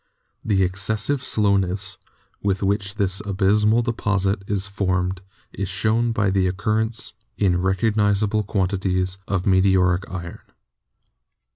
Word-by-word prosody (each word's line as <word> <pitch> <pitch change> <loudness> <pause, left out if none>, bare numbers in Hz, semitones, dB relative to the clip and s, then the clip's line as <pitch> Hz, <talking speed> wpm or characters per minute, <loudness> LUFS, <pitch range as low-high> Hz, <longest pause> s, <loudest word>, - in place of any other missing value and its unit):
The 100 -3 +2
ex 95 +1 -1
cessive 110 +6 +1
slowness 100 -5 +1 0.5
with 100 -1 -1
which 100 +1 -1
this 100 -2 0
abyssmal 105 +3 +2
deposit 105 -4 0
is 100 -1 0
formed 95 -2 -1 0.3
is 95 -2 -4
shown 110 +5 +1
by 105 -4 +1
the 95 -1 +2
occurrence 110 +4 -1 0.2
in 90 -3 +2
recognisable 105 +2 +1
quan 95 -2 -1
tities 95 -1 -1
of 95 -2 -1
meteoric 95 -1 +3
iron. 85 -2 -7
100 Hz, 120 wpm, -22 LUFS, 95-105 Hz, 0.5 s, meteoric